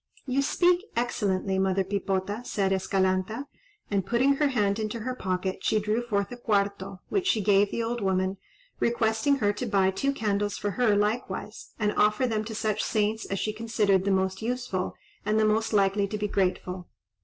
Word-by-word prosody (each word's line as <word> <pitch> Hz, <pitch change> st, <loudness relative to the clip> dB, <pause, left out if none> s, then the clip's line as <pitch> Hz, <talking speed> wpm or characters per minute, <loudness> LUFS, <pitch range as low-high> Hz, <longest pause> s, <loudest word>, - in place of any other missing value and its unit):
"You 270 Hz, 0 st, +1 dB
speak 350 Hz, +5 st, +3 dB
excellently, 200 Hz, -5 st, 0 dB
Mother 190 Hz, 0 st, +2 dB
Pipota," 195 Hz, +2 st, -2 dB
said 195 Hz, -5 st, -1 dB
Escalanta; 190 Hz, +5 st, 0 dB, 0.5 s
and, 200 Hz, -1 st, +1 dB
putting 255 Hz, +7 st, +2 dB
her 295 Hz, -, +3 dB
hand 210 Hz, -6 st, +1 dB
into 220 Hz, +1 st, -3 dB
her 255 Hz, +3 st, -2 dB
pocket, 185 Hz, -4 st, -2 dB
she 215 Hz, -, +2 dB
drew 210 Hz, +3 st, 0 dB
forth 200 Hz, -4 st, -1 dB
a 245 Hz, -, -6 dB
cuarto, 200 Hz, -4 st, -1 dB
which 375 Hz, -2 st, 0 dB
she 230 Hz, -, +3 dB
gave 205 Hz, 0 st, +4 dB
the 230 Hz, -, -2 dB
old 235 Hz, +1 st, -2 dB
woman, 190 Hz, 0 st, 0 dB, 0.4 s
requesting 230 Hz, +3 st, +2 dB
her 205 Hz, -6 st, +1 dB
to 240 Hz, +4 st, -4 dB
buy 195 Hz, -3 st, +3 dB
two 275 Hz, +8 st, 0 dB
candles 205 Hz, -5 st, -1 dB
for 205 Hz, -, -2 dB
her 220 Hz, 0 st, +2 dB
likewise, 210 Hz, +4 st, -2 dB
and 210 Hz, -1 st, 0 dB
offer 210 Hz, +4 st, +3 dB
them 220 Hz, -3 st, 0 dB
to 220 Hz, 0 st, -6 dB
such 215 Hz, -1 st, -1 dB
saints 215 Hz, 0 st, 0 dB
as 195 Hz, -, -3 dB
she 215 Hz, +2 st, -1 dB
considered 215 Hz, -4 st, +1 dB
the 200 Hz, -, 0 dB
most 190 Hz, 0 st, 0 dB
useful 225 Hz, -6 st, -2 dB, 0.3 s
and 215 Hz, +1 st, +1 dB
the 215 Hz, -, +4 dB
most 220 Hz, +1 st, +1 dB
likely 200 Hz, -1 st, +2 dB
to 210 Hz, -, -4 dB
be 210 Hz, 0 st, -1 dB
grateful. 185 Hz, -2 st, -1 dB
210 Hz, 185 wpm, -27 LUFS, 195-230 Hz, 0.5 s, gave